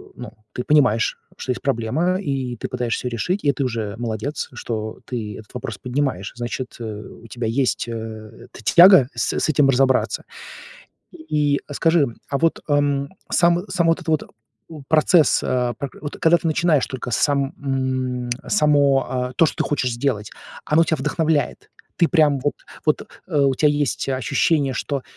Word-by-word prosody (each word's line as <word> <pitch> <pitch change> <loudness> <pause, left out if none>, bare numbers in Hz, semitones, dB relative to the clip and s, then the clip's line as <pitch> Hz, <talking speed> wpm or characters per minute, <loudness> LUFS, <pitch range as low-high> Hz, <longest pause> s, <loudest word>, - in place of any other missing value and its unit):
ну, - - -8 0.2
ты 125 - -3
понимаешь, 125 -7 +3 0.2
что 130 - -3
есть 120 - -4
проблема, 140 +8 0
и 135 -6 -2
ты - - -4
пытаешься 125 0 -2
её 125 - -3
решить, 180 - -2
и 140 - +4
ты 135 +1 -3
уже 110 -4 -3
молодец, 120 +5 -3
что 110 -2 -5
ты 110 -5 -5
этот 105 - -15
вопрос 115 -4 -5
поднимаешь, 125 -7 -2
значит, 120 +1 -5
э, 120 - -6 0.4
у - - -12
тебя 120 +1 -5
есть, 120 +1 0
э, 110 0 -8
эта - - -13
тяга 175 -6 +7
с - - -1
с - - 0
этим 140 -2 +3
разобраться. 130 0 +2 0.9
И 150 - 0
скажи, 165 0 +3 0.2
а 140 - -1
вот, 165 +1 +1
ам, 145 -1 +1 0.2
сам, 175 +2 +3
само 170 -3 +2
вот 175 - -3
это 160 - -3
вот, 155 - +2 0.5
у 155 -3 -9
процесс, 160 +1 +4
а 125 -1 0
пр 135 +3 -5
вот 145 - -6
когда 165 +1 +5
ты 170 - -5
начинаешь 155 -2 +2
только 130 -1 -6
сам, 140 +3 +1
м, 130 -2 -2 0.2
само, 145 -6 +3
а, 125 -1 -2
то, 165 - +4
что - - -4
ты - - 0
хочешь 130 -4 0
сделать, 120 -4 -2 0.4
оно 165 +2 +4
тя 160 - 0
вдохновляет. 150 +2 -1 0.3
Ты 170 - +4
прямо 150 -5 +3
вот, 145 - +1 0.3
вот, 155 - +2 0.3
э, 150 -5 +1
у 135 -1 +3
тебя 150 +3 +3
есть 145 -2 -1
ощущение, 135 +2 +1
что 140 0 -3
135 Hz, 175 wpm, -21 LUFS, 125-150 Hz, 0.9 s, тяга